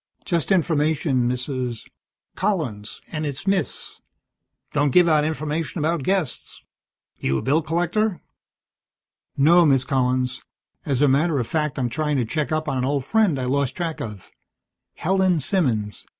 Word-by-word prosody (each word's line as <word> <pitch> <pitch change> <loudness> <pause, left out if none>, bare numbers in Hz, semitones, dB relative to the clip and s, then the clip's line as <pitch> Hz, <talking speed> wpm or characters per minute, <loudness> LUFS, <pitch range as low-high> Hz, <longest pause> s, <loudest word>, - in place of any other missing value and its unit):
"Just 170 -2 -1
information, 150 -7 +2
Mrs. 125 -2 -3 0.2
" - - -60
"Collins, 150 - -2
and 155 -1 -3
it's 145 +1 -4
Miss. 195 -1 -1 0.7
Don't 145 -1 +2
give 175 +5 +5
out 155 -2 +4
information 155 +1 -2
about 160 +1 0
guests. 185 -2 -2 0.6
You 65 0 0
a - - -3
bill 145 +5 +2
collector?" 175 +4 0 1.2
"No, 170 +5 +6
Miss 135 -5 +4
Collins. 130 -1 0 0.5
As 140 0 +1
a - - +5
matter 145 +3 +2
of 125 - 0
fact, 150 +2 -2
I'm 125 -2 0
trying 150 +3 -1
to 125 - +1
check 150 +6 -2
up 155 0 -1
on 135 -3 -1
an 125 - 0
old 140 -1 -1
friend 215 -7 +2
I 130 - -2
lost 140 0 0
track 170 -3 -3
of. 105 -4 -8 0.6
Helen 185 -1 +2
Simmons. 125 - -1
150 Hz, 150 wpm, -23 LUFS, 130-170 Hz, 1.2 s, No